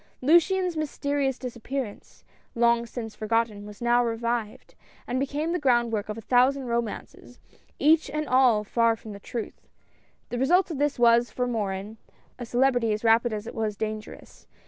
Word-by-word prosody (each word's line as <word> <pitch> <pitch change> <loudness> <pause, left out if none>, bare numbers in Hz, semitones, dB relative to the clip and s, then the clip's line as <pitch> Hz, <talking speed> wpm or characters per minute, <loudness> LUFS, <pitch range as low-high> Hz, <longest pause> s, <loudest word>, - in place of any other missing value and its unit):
Luciane's 345 +5 +3
mysterious 285 -3 -1
disappearance, 245 -1 -6 0.3
long 235 0 +2
since 225 -2 -6
forgotten, 215 -1 -1
was 210 +3 -10
now 240 0 +3
revived, 230 -1 -3 0.3
and 250 +1 -2
became 290 +4 -2
the 355 - 0
groundwork 235 -6 +1
of 210 - -4
a - - -7
thousand 255 +4 +3
romances, 235 -2 -5 0.4
each 310 0 +3
and 305 +2 -3
all 250 -5 +4
far 230 +2 +2
from 220 0 -11
the 200 - -9
truth. 225 +2 -7 0.6
The 245 - -3
result 350 +8 +3
of 310 - -4
all - - -7
this 290 -1 0
was, 235 0 +4
for 250 - -2
Morin, 210 -2 -3 0.4
a 240 - -6
celebrity 245 -2 +2
as 215 - -4
rapid 230 +1 +4
as 215 0 -4
it - - -7
was 215 -2 -3
dangerous. 215 0 -7
240 Hz, 165 wpm, -26 LUFS, 225-270 Hz, 0.6 s, all